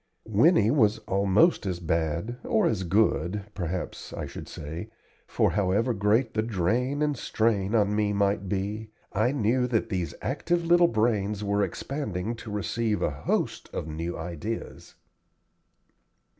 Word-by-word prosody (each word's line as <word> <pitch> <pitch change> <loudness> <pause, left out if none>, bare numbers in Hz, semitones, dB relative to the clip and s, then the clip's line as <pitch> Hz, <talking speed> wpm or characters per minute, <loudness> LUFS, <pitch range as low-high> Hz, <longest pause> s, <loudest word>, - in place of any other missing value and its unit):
Winnie 110 - +4
was 110 -6 +3
almost 100 - +3
as 90 -2 -2
bad, 85 +7 -1
or 225 -5 +2
as 110 - +1
good, 100 0 +1
perhaps 90 -1 -4
I - - -4
should - - -8
say; 80 +8 -7 0.4
for, - - +2
however 105 +6 +1
great 110 +4 +2
the 110 - +1
drain 115 - 0
and 150 -1 +1
strain 110 -4 0
on 105 -2 +3
me 105 -1 +1
might 100 -1 0
be, 105 +3 -3 0.2
I 110 +5 +2
knew 125 -1 +1
that 115 -3 0
these 90 -5 -2
active 170 -1 -1
little 175 +1 +6
brains 105 -3 0
were 100 0 +1
expanding 110 -4 -3
to 110 - -9
receive 105 +1 -1
a - - +1
host - - -2
of - - -4
new 80 +2 -4
ideas. 90 +7 -6
105 Hz, 145 wpm, -27 LUFS, 95-115 Hz, 0.4 s, little